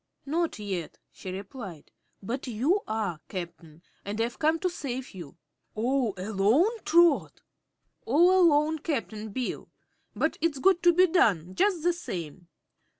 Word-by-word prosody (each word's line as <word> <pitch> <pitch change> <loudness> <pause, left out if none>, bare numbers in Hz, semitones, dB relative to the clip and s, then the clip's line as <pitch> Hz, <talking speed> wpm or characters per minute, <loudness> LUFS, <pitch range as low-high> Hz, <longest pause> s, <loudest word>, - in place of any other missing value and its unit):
"Not 330 +4 -1
yet," 195 -6 -5
she 190 - -9
replied; 195 - -8 0.3
"but 250 +7 -4
you 265 - +1
are, 210 -7 -2
Cap'n, 170 -3 -8 0.2
and 205 +2 -5
I've 235 +1 -2
come 315 +1 +2
to 370 - +1
save 265 -7 -5
you." 175 -3 -10 0.4
"All 240 -1 0
alone, 220 - +1
Trot?" 340 -2 +3 0.7
"All 335 +9 +5
alone, 315 -4 +4
Cap'n 225 -8 -4
Bill. 245 +4 -4 0.5
But - - 0
it's 325 -4 0
got 370 +4 +3
to 345 0 +5
be 365 +1 +6
done, 195 - +2
jus' 370 - +1
the 350 0 +3
same." 175 - -7
250 Hz, 140 wpm, -27 LUFS, -, 0.7 s, be